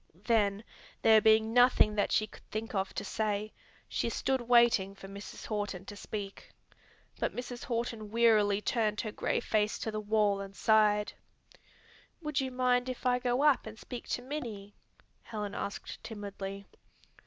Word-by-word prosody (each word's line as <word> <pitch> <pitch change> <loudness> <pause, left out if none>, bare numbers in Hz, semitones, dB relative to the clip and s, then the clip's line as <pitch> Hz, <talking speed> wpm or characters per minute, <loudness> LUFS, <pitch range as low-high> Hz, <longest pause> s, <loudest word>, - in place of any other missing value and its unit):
Then 210 -3 +2 0.4
there 220 -1 +7
being 220 +1 +4
nothing 245 -3 +5
that 205 -1 0
she 215 - +3
could - - -15
think 220 +1 -4
of 195 -1 -1
to - - -3
say, 215 0 -2 0.3
she - - -1
stood 265 +2 0
waiting 235 -5 +4
for 195 - -11
Mrs. 200 +1 -9
Horton 205 -3 -3
to 205 - -8
speak. 205 -1 -7 0.7
But - - -1
Mrs. 245 0 -6
Horton 230 -3 -3
wearily 215 -3 +4
turned 215 -2 0
her 215 - -4
gray - - -1
face 215 -1 0
to 220 - -3
the 215 - -3
wall 210 -1 +1
and 195 0 -8
sighed. 210 -1 +3 1.1
"Would 300 -4 -1
you 265 - -2
mind 250 0 +1
if 255 0 -6
I 250 0 +3
go 250 +2 +1
up 295 -6 +4
and 220 0 -9
speak 245 +1 -8
to 245 - -2
Minnie?" 230 -8 -6 0.5
Helen 210 -2 -5
asked 200 0 -6
timidly. 200 -2 -6
215 Hz, 160 wpm, -31 LUFS, 205-240 Hz, 1.1 s, there